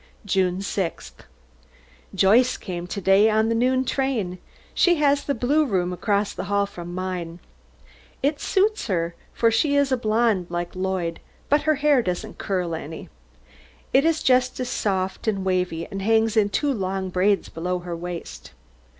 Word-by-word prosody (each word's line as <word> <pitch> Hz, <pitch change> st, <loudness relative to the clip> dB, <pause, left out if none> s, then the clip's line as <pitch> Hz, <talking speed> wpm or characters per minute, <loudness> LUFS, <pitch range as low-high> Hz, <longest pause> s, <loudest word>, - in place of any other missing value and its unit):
JUNE 185 Hz, -1 st, +1 dB
6th. 195 Hz, -3 st, -4 dB, 0.9 s
Joyce 220 Hz, +7 st, +4 dB
came 175 Hz, -1 st, -6 dB
to 200 Hz, -, -4 dB
day 195 Hz, +3 st, +5 dB
on 220 Hz, +1 st, +2 dB
the -, -, +2 dB
noon 255 Hz, +3 st, +2 dB
train. 235 Hz, -10 st, -1 dB, 0.3 s
She 355 Hz, -1 st, +4 dB
has 285 Hz, -2 st, +2 dB
the 280 Hz, -, -1 dB
blue 280 Hz, +7 st, +2 dB
room 185 Hz, -9 st, 0 dB
across 200 Hz, +2 st, 0 dB
the -, -, -5 dB
hall 200 Hz, 0 st, +1 dB
from 175 Hz, -3 st, -8 dB
mine. 180 Hz, -2 st, -4 dB, 0.9 s
It 285 Hz, +1 st, +1 dB
suits 420 Hz, -, +1 dB
her, 170 Hz, -4 st, -1 dB, 0.2 s
for 230 Hz, -1 st, +2 dB
she 285 Hz, +5 st, +2 dB
is 280 Hz, -1 st, +2 dB
a 260 Hz, -, +3 dB
blonde 220 Hz, -5 st, +1 dB
like 175 Hz, +1 st, -4 dB
Lloyd, 185 Hz, -3 st, -2 dB, 0.3 s
but 290 Hz, +1 st, +4 dB
her 310 Hz, -, +4 dB
hair 290 Hz, -2 st, +3 dB
doesn't 195 Hz, +2 st, -4 dB
curl 180 Hz, -4 st, -2 dB
any. 160 Hz, 0 st, -7 dB, 0.8 s
It 270 Hz, -, +5 dB
is 325 Hz, -1 st, +1 dB
just 255 Hz, -1 st, +3 dB
soft 190 Hz, -5 st, -2 dB
and 195 Hz, -3 st, 0 dB
wavy, 180 Hz, -3 st, 0 dB
and 195 Hz, -1 st, -6 dB
hangs 225 Hz, +1 st, +2 dB
in 210 Hz, -2 st, +3 dB
two 280 Hz, +8 st, 0 dB
long 190 Hz, -3 st, -2 dB
braids 195 Hz, +2 st, +2 dB
below 180 Hz, +2 st, -3 dB
her 175 Hz, -1 st, -6 dB
waist. 170 Hz, -, -7 dB
200 Hz, 160 wpm, -23 LUFS, 180-250 Hz, 0.9 s, day